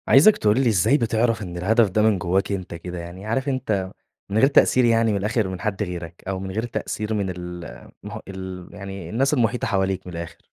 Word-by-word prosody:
عايزك 160 +11 +7
تقول 105 +1 +2
ي - - +5
إزاي 110 - +4
بتعرف 115 -2 +1
إن 90 -3 -6
الهدف 110 +4 +3
ده 105 +3 +1
من 110 -3 +3
جواك 95 +3 0
أنت 95 -3 -4
كده؟ 90 +1 -6
يعني 85 +3 -8
عارف 130 +6 -1
انت 110 -8 -1 0.4
من 100 - -1
غير 135 - +6
تأثير 130 -2 +4
يعني 115 -1 +3
من 100 - +1
الآخر 105 +1 0
من 95 -1 -6
حد 105 -1 -1
غيرك، 85 -3 -7
أو 95 -1 -2
من 95 0 -5
غير 110 +4 -2
تأثير 110 -2 -3
من 100 -3 -1
المح 90 -8 -8
ال 95 -2 -7
يعني 95 -4 -7
الناس 135 +8 +1
المحيطة 120 -3 +1
حواليك 95 -3 0
من 90 - -7
الآخر؟ 85 0 -6
100 Hz, 210 wpm, -23 LUFS, 90-115 Hz, 0.4 s, عايزك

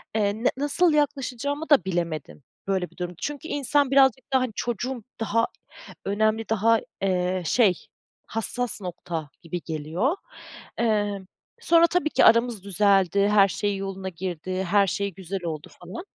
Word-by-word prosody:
eee, 205 -2 +2
ne - - +5
nasıl 300 +4 +2
yaklaşacağımı 285 +1 -1
da 265 - +5
bilemedim. 170 -6 -3 0.2
Böyle 190 -2 -1
bir - - -24
durum. 180 0 -4
Çünkü 295 +2 -4
insan 285 -1 +1
birazcık 270 0 +3
da 265 - +5
hani 255 -2 -1
çocuğum 245 +1 -3 0.2
daha 225 +1 +1 0.6
önemli, 215 +2 0
daha, 225 +1 +3 0.2
eee, 185 -1 0
şey, 200 -6 +2 0.4
hassas 225 0 -2
nokta 170 -4 -5
gibi 170 +1 -5
geliyor. 160 - -1 0.6
Eee, 205 -3 +1 0.4
sonra 335 -4 +5
tabii 355 -3 +1
ki - - +4
aramız 230 -3 +4
düzeldi, 200 0 +3
her 205 -1 +6
şey 200 +3 -2
yoluna 195 -1 -4
girdi, 185 +1 -4
her 195 +2 +3
şey 200 +2 -2
güzel 190 +1 -6
oldu 155 -2 -5
falan. 185 - -8
205 Hz, 145 wpm, -25 LUFS, 185-250 Hz, 0.6 s, her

